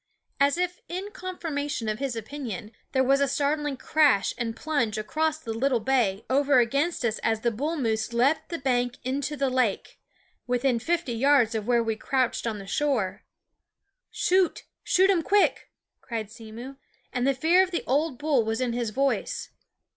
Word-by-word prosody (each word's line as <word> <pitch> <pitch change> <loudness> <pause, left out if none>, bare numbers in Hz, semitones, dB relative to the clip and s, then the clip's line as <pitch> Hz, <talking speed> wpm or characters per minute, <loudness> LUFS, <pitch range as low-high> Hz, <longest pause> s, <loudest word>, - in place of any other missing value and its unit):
As 280 +3 +3
if 360 0 -2
in 380 +4 -5
confirmation 300 - -4
of 215 +1 -2
his 270 -3 -2
opinion, 225 -3 -6 0.2
there 260 -1 +2
was 275 +2 +3
a 280 - +3
startling 290 0 0
crash 285 -8 +3
and 230 -2 -3
plunge 245 -7 -1
across 310 +8 -1
the 230 -8 -5
little 250 +2 +1
bay 225 -5 +1
over 275 +1 +3
against 275 +5 +1
us 220 -1 0
as 225 0 -1
a 235 - +3
bull 295 +9 -2
moose 225 -4 -1
leaped 250 +6 +1
the 335 - -3
bank 245 -3 0
into 280 +3 -2
the 275 0 +1
lake, 250 -6 -1 0.5
within 245 0 +1
fifty 335 -1 -1
yards 245 -1 +3
of 220 -1 -3
where 240 -1 +3
we 225 -1 -1
crouched 255 +1 -1
on 220 -2 -2
the 200 - -8
shore. 215 -5 -1 0.4
" 405 +5 -56 0.2
Shoot! 370 -1 +2 0.2
shoot 380 +2 +4
um 360 -4 +2
quick! 405 +5 +2 0.2
" - - -58
cried 220 -3 -5
Simmo; 230 +4 -9 0.4
and 250 +1 0
the 275 - +2
fear 330 +7 +4
of 380 - +1
the 345 - -2
old 285 +1 0
bull 290 -4 +2
was 225 +1 -2
in 250 -2 0
his 235 -2 -1
voice. 275 - -1
265 Hz, 180 wpm, -26 LUFS, 230-300 Hz, 0.5 s, shoot